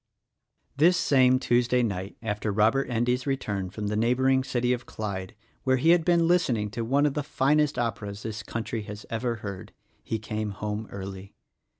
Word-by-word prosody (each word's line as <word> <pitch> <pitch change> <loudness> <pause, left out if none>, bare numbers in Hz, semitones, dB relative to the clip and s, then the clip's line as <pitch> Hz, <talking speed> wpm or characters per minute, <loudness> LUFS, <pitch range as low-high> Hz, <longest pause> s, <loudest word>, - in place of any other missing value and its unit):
This 170 +5 +5
same 130 -6 +4
Tuesday 125 0 +2
night, 100 -3 -3
after 105 -1 -2
Robert 110 +7 +2
Endy's 125 +2 0
return 105 -9 -2
from 105 +3 -6
the 105 +1 -1
neighboring 130 +4 +2
city 125 -1 0
of 120 -1 -5
Clyde 100 -2 -5
— - - -38
where 130 0 +3
he 160 +6 +4
had 175 -1 +4
been 170 -1 +3
listening 125 - +2
to 115 - -3
one 140 +5 +2
of 145 - +1
the 150 - -1
finest 150 +1 +1
operas 105 -3 -3
this 110 -1 -4
country 115 +1 -4
has 105 0 -8
ever 115 +1 -1
heard, 100 -4 -7
— - - -40
he 110 - -2
came 110 0 -3
home 105 +2 -4
early. 95 0 -8
115 Hz, 185 wpm, -27 LUFS, 105-130 Hz, -, This